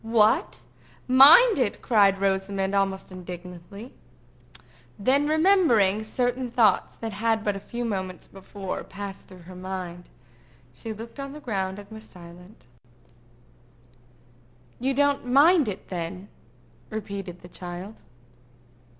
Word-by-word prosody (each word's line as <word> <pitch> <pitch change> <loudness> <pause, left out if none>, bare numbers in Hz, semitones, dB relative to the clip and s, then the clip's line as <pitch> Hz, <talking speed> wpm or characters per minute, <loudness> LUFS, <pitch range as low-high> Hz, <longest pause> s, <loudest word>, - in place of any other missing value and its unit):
"What! 225 -1 +2 0.5
mind 295 - +8
it?" 235 -6 0
cried 200 -5 +4
Rosamond, 195 0 -1
almost 195 -1 -1
indignantly. 180 +4 -10 1.0
Then 275 +7 +2
remembering 310 - +3
certain 245 +3 -2
thoughts 230 -2 +2
that 225 -2 -6
had 220 +1 0
but 205 -2 -1
a - - -5
few 240 +4 -5
moments 190 -4 -4
before 195 0 -7
passed 200 -1 -9
through 185 -2 -14
her 185 +2 -12
mind, 180 -1 -7 0.6
she 220 - -7
looked 230 +5 -9
on 275 0 -6
the 300 - -9
ground 195 -8 -3
and 205 -1 -11
was 220 0 -9
silent. 175 - -15 2.1
"You 265 +2 -1
don't 285 0 +2
mind 290 +3 +5
it, 200 -2 -6
then?" 180 +2 -6 0.6
repeated 200 -4 -6
the 175 - -12
child. 180 +4 -9
205 Hz, 120 wpm, -25 LUFS, 190-245 Hz, 2.1 s, mind